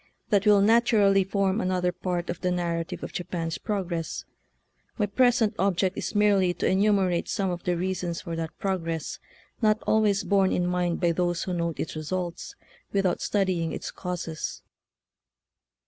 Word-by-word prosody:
That 205 0 +3
will 205 -1 +6
naturally 210 -3 +4
form 195 +2 0
another 180 -2 +1
part 180 -1 -3
of 175 - -7
the 180 - +1
narrative 170 -2 -2
of - - -6
Japan's 170 -2 -3
progress. 175 -6 -3 0.7
My 210 - +2
present 240 0 +3
object 190 0 +1
is - - -4
merely 200 -4 +3
to - - -2
enumerate 190 -3 +2
some 195 -3 0
of 175 -1 -4
the 175 -1 +1
reasons 180 -1 -2
for 170 -2 -5
that 165 -1 -5
progress 165 -5 -3 0.4
not 215 -1 +3
always 215 -2 +3
borne 195 -2 +3
in 180 - +1
mind 180 -1 0
by 170 -2 +3
those 175 0 0
who 185 - -3
note 170 -2 -2
its 160 - -3
results 175 +2 -4 0.4
with 195 -1 +1
out 180 - +1
studying 185 -5 0
its - - -5
causes. 175 -3 -5
185 Hz, 160 wpm, -26 LUFS, 175-200 Hz, 0.7 s, will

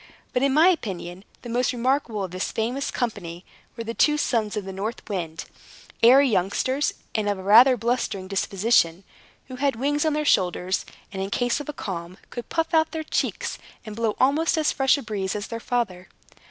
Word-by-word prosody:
But 250 - +1
in 275 0 +3
my 315 +6 +6
opinion, 190 - -3 0.2
the 240 - -7
most 245 +2 +1
remarkable 245 -4 0
of 185 - -5
this 185 +1 -3
famous 245 +5 -2
company 180 -8 -4 0.3
were 230 - -4
two 230 +6 +2
sons 225 -7 0
of 205 - -3
the 190 - -6
North 210 +5 -5
Wind 165 -6 -4 0.6
(airy 265 +4 +7
youngsters, 250 +7 0 0.2
and 210 -2 0
of 205 - -1
rather 225 +7 +6
a - - -10
blustering 230 -5 -1
disposition) 195 -2 +1 0.4
who 255 -1 -8
had 280 0 +1
wings 290 +5 0
on 310 -1 +1
their 300 0 -1
shoulders, 185 -5 +1 0.3
and, 190 - -4
in 195 - -3
case 245 +5 0
of 290 - -7
a - - -3
calm, 180 -6 -6
could 240 - -7
puff 325 +1 -1
out 320 0 +4
their 320 -1 -3
cheeks, - - -2 0.3
and 215 -1 -7
blow 225 -1 -1
almost 300 +6 +2
as 310 -1 +2
fresh 270 +1 +3
a 280 - -6
breeze 200 -4 -3
as 205 0 -3
their 230 - -4
father. 210 -7 -2
230 Hz, 195 wpm, -24 LUFS, 195-270 Hz, 0.6 s, airy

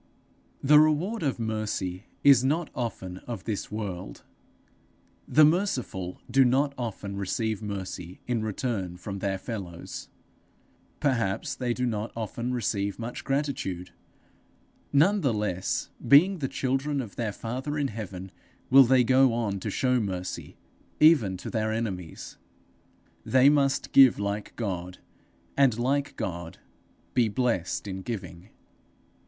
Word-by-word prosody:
The 150 +2 +7
reward 155 +9 +2
of 140 -5 0
mercy 110 -4 -3 0.2
is 140 -3 +7
not 155 +5 0
often 95 -7 -4
of 120 -2 -5
this 110 -2 -4
world; 95 - -5 1.0
the 155 0 +6
merciful 135 - -1
do 135 0 +4
not 135 +3 +2
often 105 -5 -5
receive 110 +2 -2
mercy 95 -4 -6
in 120 -2 -1
return 105 -4 -3
from 95 +2 -6
their 95 0 -1
fellows; 95 -5 -7 0.9
perhaps 120 -2 0
they 125 -2 -2
do 125 - -1
not 110 -2 -2
often 115 +2 -3
receive 100 -5 -1
much 115 +1 -6
gratitude. 135 -11 -2 1.0
None 185 +9 +4
the 135 -8 +1
less, 95 -3 -2 0.2
being 175 +7 +6
the 135 - -1
children 135 +2 -1
of 115 -7 -6
their 115 -3 -2
father 130 +8 -4
in 140 -2 0
heaven, 95 -4 -7 0.4
will 135 0 +9
they 130 +1 +5
go 130 +1 +5
on 105 -4 -1
to 105 - -4
show 125 +4 +1
mercy, 95 -4 -4 0.4
even 135 - +5
to - - -7
their 110 -1 0
enemies. 95 -7 -5 0.8
They 130 +1 +5
must 140 -2 +1
give 135 -3 +7
like 100 0 -3
God, 90 -5 -4 0.6
and 135 -5 +4
like 140 +4 0
God 85 -1 -5 0.6
be 120 -3 +3
blessed 105 -6 -1
in 95 -1 -5
giving. 95 -4 -7
115 Hz, 130 wpm, -27 LUFS, 100-135 Hz, 1.0 s, will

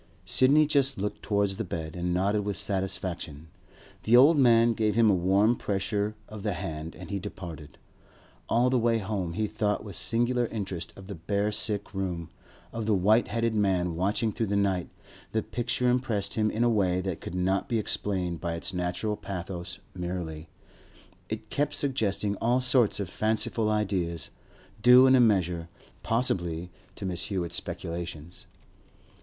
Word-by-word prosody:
Sidney 145 +4 +4
just 140 -2 +2
looked 105 +2 -3
towards 100 -2 0
the - - -2
bed, 80 -4 -5
and 90 0 -2
nodded 100 +4 +1
with 100 -1 -3
satisfaction. 90 -5 -3 0.5
The 115 +3 +5
old 145 +6 +7
man 120 -4 +5
gave 105 -2 0
him 115 -2 +5
a - - +3
warm 95 +6 +3
pressure 105 0 -2
of 110 -1 -9
the 105 -1 -1
hand, 80 -1 -5
and - - -9
he 100 - -1
departed. 80 -6 -8 0.7
All 125 +2 +3
the 130 - +3
way 115 0 +2
home, 95 -5 -3
he 110 +5 0
thought 105 0 -1
with 100 -4 -8
singular 120 +3 +1
interest 95 -7 -4
of 95 - -11
the 100 - -6
bare 100 +5 -1
sick 105 0 -1
room, 90 -4 -3 0.4
of 115 -2 -4
the 110 - +3
white 105 +5 +3
headed 115 -1 0
man 95 -5 +1
watching 105 +5 0
through 110 +2 -2
the 100 - 0
night; 95 -3 +1 0.4
the 110 -1 +1
picture 125 +1 -1
impressed 120 -6 0
him 110 -1 +1
in 110 +2 0
a - - +4
way 95 -6 +2
that 95 -3 -4
could 90 - -6
not 95 +2 0
be 115 - +1
explained 95 -5 -2
by 85 -1 -2
its 85 +3 -3
natural 90 +4 -2
pathos 90 -3 -6 0.2
merely; 85 -3 -5 0.8
it 110 0 -6
kept 145 0 0
suggesting 110 -8 -1
all 120 +2 +2
sorts 125 -4 +2
of 100 - -2
fanciful 110 +3 0
ideas, 95 -7 -1 0.5
due 125 +3 +8
in 130 - +6
a - - +5
measure, 90 -7 +2 0.3
possibly, 90 -7 0 0.2
to - - -6
Mrs. 90 -2 0
Hewett's 85 -4 -1
speculations. 85 -2 -5
100 Hz, 165 wpm, -28 LUFS, 90-115 Hz, 0.8 s, due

